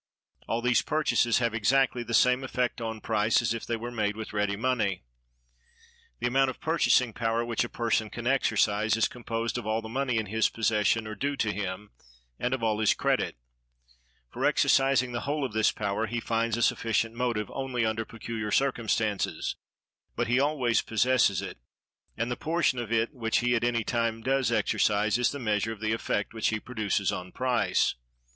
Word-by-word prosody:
All 115 +1 -1
these 125 0 +3
purchases 150 -6 +1
have 115 -2 0
exactly 125 +3 +2
the 115 0 -2
same 125 +2 +4
effect 125 -2 -2
on 110 -1 -4
price 110 0 +2
as - - 0
if 115 - -6
they 120 - 0
were 120 +2 -6
made 105 -3 -1
with 110 -1 -7
ready 105 -1 0
money. 110 -5 -1 1.2
The - - -2
amount 135 +2 +3
of 130 - -7
purchasing 130 -7 +2
power 115 +1 -1
which 115 -1 0
a 120 - -5
person 115 -2 0
can 120 +2 -7
exercise 110 -4 +2
is 115 - +3
composed 115 0 -3
of 110 - -8
all 110 +1 +1
the 110 - -7
money 125 +1 -1
in 110 - 0
his 110 +2 +1
possession 110 0 +1
or 110 - -5
due 140 +7 -2
to 110 -6 -1
him, 95 +1 -5 0.5
and 125 +2 0
of 120 - -7
all 110 -1 +1
his 110 - +3
credit. - - 0 1.0
For - - -5
exercising 135 -2 +3
the 120 - -2
whole 145 +2 -2
of 125 - -5
this 110 0 +3
power 105 +2 -2
he 120 +2 -2
finds 115 0 -1
a 120 - 0
sufficient 115 0 +1
motive 115 -4 -2
only 130 -3 -1
under 110 0 -1
peculiar 115 -1 -5
circumstances, 110 -5 0 0.6
but - - 0
he 125 +2 +2
always 135 -5 +2
possesses 115 -4 +2
it; - - -7 0.6
and 115 +1 -2
the - - 0
portion 155 -5 0
of 115 -2 -5
it 115 +4 +1
which 115 -4 0
he 120 0 +2
at 115 - 0
any 120 -1 +1
time 115 -1 -1
does 135 +1 +1
exercise 105 +2 +1
is 125 - +2
the 145 - -5
measure 110 -3 0
of 110 - -7
the 110 +1 -1
effect 110 -2 -2
which 110 - 0
he 110 - 0
produces 105 -4 -1
on 90 0 -6
price. 130 -1 +1
115 Hz, 190 wpm, -28 LUFS, 110-125 Hz, 1.2 s, same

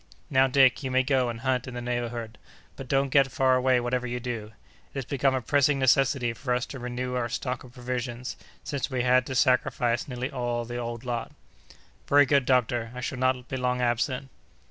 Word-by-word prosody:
Now, 135 -1 +5
Dick, 130 -1 +4
you 135 - -3
may 130 0 +3
go 130 -2 +1
and 115 -1 -6
hunt 130 -1 0
in 125 - -7
the - - -3
neighborhood, 120 -2 -4 0.4
but 135 - -8
don't 135 +1 +1
get 135 0 +4
far 130 +1 +3
away 130 0 +3
whatever 125 +1 -1
you 125 0 -3
do. 115 -3 -5 0.4
It - - -9
has 135 - -3
become 135 0 +1
a 130 - -2
pressing 145 +3 +3
necessity 130 -2 +2
for 125 +1 -1
us 125 - -1
to 135 - -7
renew 125 +1 -4
our 120 -1 -1
stock 125 +1 -3
of 125 -2 -14
provisions, 125 0 -4 0.3
since 140 -2 -3
we 130 -3 -1
had 125 0 +3
to 130 - -4
sacrifice 125 -2 +2
nearly 125 +1 -4
all 120 -3 -2
the 120 +1 -5
old 120 0 -5
lot." 120 -2 -3 0.7
"Very 145 0 +6
good, 140 -1 +2
doctor, 120 -3 +1
I 125 - -5
shall 125 +1 -4
not 130 -1 +1
be 130 - -4
long 125 0 0
absent." 125 +2 0
125 Hz, 210 wpm, -27 LUFS, 120-130 Hz, 0.7 s, Very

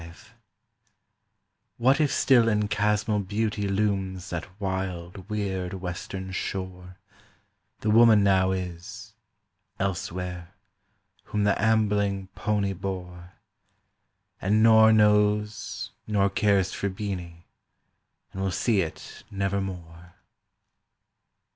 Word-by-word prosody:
V 85 0 -10 1.7
What 130 +5 +3
if 150 - +2
still 120 -4 +4
in 105 -1 +1
chasmal 105 0 +1
beauty 105 +1 -2
looms 95 -2 -1
that 90 +3 -6
wild 95 -1 -4
weird 95 -3 -3
western 95 +1 -6
shore, 95 -1 -5 0.8
The 110 - +1
woman 110 -2 +6
now 95 -1 +3
is—elsewhere—whom 95 +2 -7
the 100 0 +2
ambling 105 -3 +1
pony 100 -2 -1
bore, 90 -1 -6 1.1
And 105 +3 +2
nor 110 -1 +7
knows 105 0 +2 0.2
nor 100 -2 +2
cares 100 -2 +2
for 100 - -2
Beeny, 90 -4 -6 0.9
and 95 - -5
will 95 - 0
see 100 +2 +1
it 80 -3 -7
nevermore. 95 -3 -4
100 Hz, 90 wpm, -26 LUFS, 90-105 Hz, 1.7 s, nor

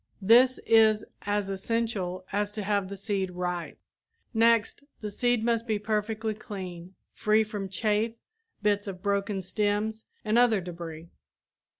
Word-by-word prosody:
This 245 +5 +6
is 220 -1 +5 0.2
as 205 -1 0
essential 195 -3 -2
as 205 0 0
to 210 - -3
have 200 -1 0
the 200 - -6
seed 195 -2 -1
ripe. 180 -1 -4 0.6
Next, 230 +2 +3 0.2
the 210 -1 -5
seed 240 +1 +1
must 230 0 +1
be 215 -1 +1
perfectly 215 +1 -1
clean, 185 -4 -8 0.2
free 215 0 +3
from 205 -3 -5
chaff, 215 +3 0 0.5
bits 205 0 +1
of 185 -2 -7
broken 200 -1 0
stems 210 +3 -1 0.2
and 215 +2 +3
other 235 -4 +4
debris. 170 -2 -8
210 Hz, 135 wpm, -28 LUFS, 190-220 Hz, 0.6 s, This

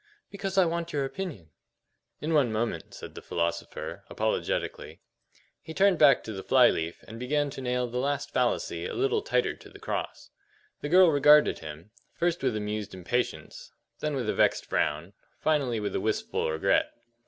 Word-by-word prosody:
"Because 195 -1 -4
I 190 - +6
want 170 0 -2
your 140 -2 0
opinion." 135 - -6 0.7
"In 160 +2 -1
one 140 -7 +3
moment," 110 -7 -3
said - - -9
the - - -9
philosopher, 85 0 -3
apologetically. - - -2 0.6
He 160 0 -9
turned 195 -3 +4
back 145 -3 +6
to 110 - -6
the 95 - -5
fly 125 +2 +5
leaf 80 +1 -4
and 115 +1 -9
began 145 +3 0
to 135 - -7
nail 125 -1 0
the 120 +1 -3
last 140 +1 -1
fallacy 120 -10 0
a - - -6
little 415 +3 +1
tighter 425 -1 0
to - - -15
the - - -13
cross. - - -5 0.5
The 145 - -3
girl 180 0 +7
regarded 150 +1 +5
him, 80 +5 -10 0.2
first 175 0 0
with 130 -4 0
amused 105 -1 -4
impatience, 120 +7 -3 0.3
then 150 -1 -2
with 125 -5 -2
a - - +1
vexed - - +2
frown, 80 +6 -1 0.3
finally 140 -7 +1
with 105 -1 -3
a - - 0
wistful 110 -6 -1
regret. 80 - +2
130 Hz, 175 wpm, -28 LUFS, 105-155 Hz, 0.7 s, girl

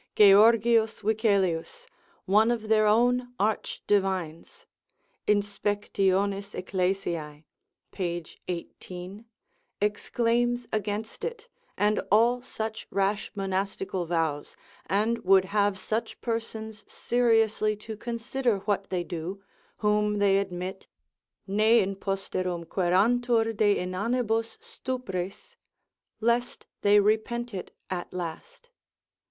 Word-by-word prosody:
Georgius 220 +2 +5
Wicelius, 205 - 0 0.4
one 210 +4 +4
of 225 -3 -2
their 215 -1 +4
own 245 +3 +2
arch 215 +1 -1
divines 190 - -1 0.6
(Inspect. 205 0 -1
eccles. 195 -1 0 0.9
pag. 175 -3 -3 0.2
18) 180 +3 -7 0.5
exclaims 235 +3 0
against 215 +1 -3
it, 475 0 -5 0.3
and 210 +1 +2
all 235 +4 +4
such 220 -3 -5
rash 200 +1 0
monastical 195 -2 -2
vows, 160 -4 -1 0.3
and 220 +4 +1
would 190 0 +4
have 200 0 +1
such 220 +4 -3
persons 220 -2 -4
seriously 225 -3 +2
to 215 +1 -8
consider 235 +1 -1
what 200 -2 -1
they 180 -2 -1
do, 175 +4 -6 0.3
whom 210 0 +1
they 200 -1 +4
admit, 190 0 -5 0.6
ne 215 +4 +4
in 195 -1 0
posterum 185 -3 -3
querantur 225 +6 +2
de 205 -1 +3
inanibus 225 +5 -1
stupris, 245 - -5 0.6
lest 235 +2 0 0.2
they 205 0 +6
repent 220 +3 0
it 190 - -6 0.2
at 180 -1 -4
last. 475 - -7
210 Hz, 100 wpm, -27 LUFS, 190-230 Hz, 0.9 s, they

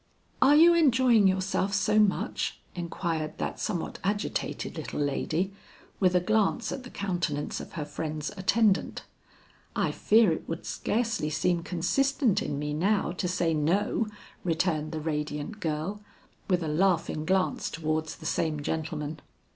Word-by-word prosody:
"Are 280 +3 +7
you 335 +3 +8
enjoying 255 - +5
yourself 190 +1 0
so 210 +1 +3
much?" 210 -2 +1 0.2
inquired 165 -2 -3
that - - -3
somewhat 180 -6 -3
agitated 205 +2 -2
little - - -5
lady, 155 +6 -1 0.5
with 185 -2 +3
a - - +6
glance 215 +4 +1
at 270 - -4
the 250 - -10
countenance 170 -9 -2
of - - -9
her 155 -3 -3
friend's 150 0 -4
attendant. 205 +1 +2 0.7
"I - - +1
fear 220 -3 +4
it 160 - -4
would 165 0 -4
scarcely 220 -8 -1
seem 170 +3 +1
consistent 215 - +1
in 145 - -3
me 150 +1 -2
now 190 +4 +1
to 180 +1 -2
say 170 -2 +1
no," 190 +8 +1 0.4
returned 160 -3 0
the 160 - -3
radiant 150 +5 -3
girl, 165 +4 -3 0.5
with 180 -3 +1
a - - -2
laughing 165 -1 +1
glance 185 +3 +1
towards 155 0 -2
the - - -13
same 155 -2 -1
gentleman. 155 -1 -3
180 Hz, 145 wpm, -28 LUFS, 155-210 Hz, 0.7 s, you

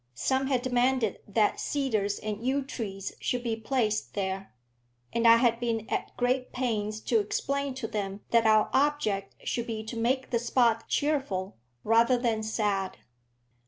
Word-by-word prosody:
Some 265 - 0
had 255 -3 +1
demanded 250 -3 +1
that 210 +1 +2
cedars 220 -8 0
and 215 +1 -5
yew 270 +2 +1
trees 195 -7 -5
should 245 -1 -1
be 230 -2 -1
placed 220 -2 -1
there, 195 -1 -3 0.6
and 235 0 +3
I 230 0 +9
had 235 -1 +2
been 230 -2 -1
at - - -3
great 255 +1 0
pains 215 -4 -2
to 230 0 +2
explain 275 +6 -2
to 260 -3 -4
them 200 -1 -4
that 230 -1 +4
our 215 -1 +4
object 265 -9 +1
should 235 0 -2
be 220 -2 -4
to 220 +2 -7
make 255 +4 0
the 235 - +2
spot 235 -1 +2
cheerful, 270 -11 -1 0.3
rather 230 +3 +4
than 230 -3 0
sad. 205 -3 -1
230 Hz, 160 wpm, -28 LUFS, 215-255 Hz, 0.6 s, I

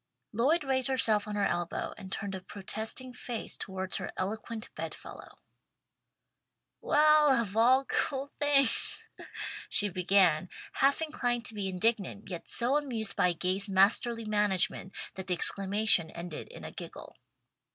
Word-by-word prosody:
Lloyd 280 +10 +2
raised 260 -2 0
herself 220 -6 +2
on 210 - -4
her 205 -1 +2
elbow 175 -2 -2
and 190 -1 -10
turned 200 -1 -3
a 190 - -5
protesting 220 +6 -5
face 240 -2 -5
towards 190 -1 -3
her - - -5
eloquent 220 +3 -4
bed - - -5
fellow. - - -12 1.4
"Well 300 -3 +5
of 210 -3 -3
all 255 +4 +5
cool 275 0 -1
things," 280 -4 +2 0.6
she 205 - +2
began, 180 -2 +3 0.2
half 280 +4 +3
inclined 245 -6 -1
to - - -8
be 205 -2 -2
indignant, 200 +1 -1
yet 175 - -6
so 250 +5 +2
amused 235 -8 -3
at 180 -2 +4
Gay's 190 +3 -1
masterly 225 +4 +3
management 205 -3 0 0.2
that 190 0 -7
the 180 - +1
exclamation 195 -1 +2
ended 170 -2 -7
in - - -11
a - - -6
giggle. - - -9
215 Hz, 140 wpm, -30 LUFS, 190-255 Hz, 1.4 s, Well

